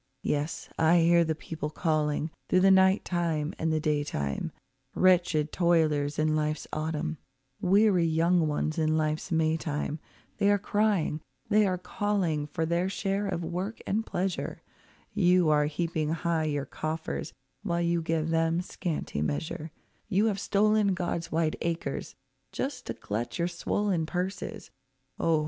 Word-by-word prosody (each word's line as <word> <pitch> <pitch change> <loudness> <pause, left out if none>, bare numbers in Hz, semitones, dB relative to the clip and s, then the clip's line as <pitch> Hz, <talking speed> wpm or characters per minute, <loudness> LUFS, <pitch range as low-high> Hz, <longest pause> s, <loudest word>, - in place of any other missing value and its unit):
Yes, 150 +2 -2
I 165 +2 +5
hear 170 +1 +5
the 160 -1 -1
people 155 -1 -5
calling, 155 -1 0 0.2
through 185 - +4
the 195 +1 +6
night 190 +1 +5
time 165 -3 -1
and 160 0 0
the 155 - +1
day 150 -1 +1
time, 70 - -3 0.4
Wretched 175 -5 +3
toilers 155 -5 +2
in 155 0 +2
life's 155 -1 -1
autumn, 155 0 -2 0.4
weary 190 -2 +4
young 165 +1 +3
ones 155 +2 -1
in 155 0 +2
life's 155 +3 -1
May 160 -1 +2
time— 150 -1 -3 0.4
They 200 -1 +4
are 205 - +5
crying, 205 -6 +1 0.3
they 210 -1 +4
are 185 -1 0
calling 180 -5 -1
for 160 +2 -2
their 170 +3 0
share 195 +1 -1
of 175 -3 -2
work 180 +6 -4
and 215 +3 0
pleasure; 185 -3 -3 0.5
You 180 -2 +4
are 150 -1 +4
heaping 155 0 -1
high 165 0 0
your 145 -2 -1
coffers 160 +1 -4 0.3
while 170 -4 -1
you 170 0 +1
give 160 0 -1
them 165 +1 +2
scanty 170 - -3
measure,— 75 - -3 0.4
You 205 +1 +3
have 205 -3 0
stolen 205 -1 +2
God's 170 -2 -3
wide 160 -1 +1
acres, 170 0 -3 0.4
just - - -4
to - - -3
glut 115 +4 -4
your 170 0 +1
swollen 175 0 -1
purses— 185 +3 -4 0.5
Oh! 165 -2 +3
165 Hz, 150 wpm, -28 LUFS, 155-185 Hz, 0.5 s, the